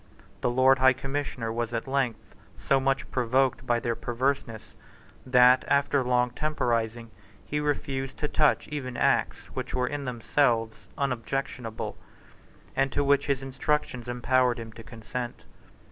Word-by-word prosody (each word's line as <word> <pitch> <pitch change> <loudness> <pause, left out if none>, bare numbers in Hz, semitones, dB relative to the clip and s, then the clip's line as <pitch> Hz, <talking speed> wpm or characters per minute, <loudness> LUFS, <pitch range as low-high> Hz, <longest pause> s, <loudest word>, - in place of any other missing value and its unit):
The - - +1
Lord 130 +2 +4
High 130 0 +6
Commissioner 135 -4 -3
was 120 0 -2
at 115 - -3
length 135 -4 -2 0.3
so 135 - +4
much 135 0 -1
provoked 130 0 +1
by 120 -1 +2
their 115 0 -1
perverseness 120 -2 -2 0.5
that, 125 0 +6
after 140 -1 +2
long 125 0 +2
temporising, 115 -6 -1 0.3
he 150 - -2
refused 135 -2 -2
to 150 - -1
touch 150 -1 +2
even 130 -4 -4
Acts - - +1
which - - -4
were 125 -1 +1
in 145 +2 -4
themselves 115 -3 0
unobjectionable, 125 -3 -3 0.8
and 135 0 +1
to 145 - +1
which 140 0 +3
his 135 -2 0
instructions 135 -2 -2
empowered 125 0 +2
him 115 -1 -7
to 115 - -11
consent. 120 +2 -6
125 Hz, 140 wpm, -27 LUFS, 120-135 Hz, 0.8 s, High